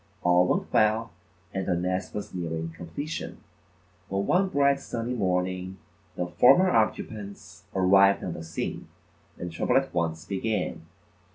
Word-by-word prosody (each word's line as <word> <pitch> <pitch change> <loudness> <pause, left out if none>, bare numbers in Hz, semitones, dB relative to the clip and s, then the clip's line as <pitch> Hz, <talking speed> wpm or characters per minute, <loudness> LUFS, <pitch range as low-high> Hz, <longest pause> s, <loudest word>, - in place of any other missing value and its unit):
All 90 0 +4
went - - -1
well 110 +1 +3 0.4
and 95 -1 -3
the 90 - +2
nest 90 +2 -2
was 105 - -5
nearing 80 -2 -3
completion, 85 - -6 0.7
when 95 +1 -1
one 190 +2 +3
bright 140 -3 +3
sunny 120 +1 -4
morning, 95 -3 -1 0.4
the 90 - -1
former 180 - +5
occupants 110 - -2
arrived 95 +1 +5
on 90 - -3
the 80 - -7
scene 80 -1 -5 0.5
and 90 0 -5
trouble 80 - +1
at 135 0 0
once 80 -1 -1
began. 100 +1 -2
95 Hz, 140 wpm, -27 LUFS, 90-110 Hz, 0.7 s, former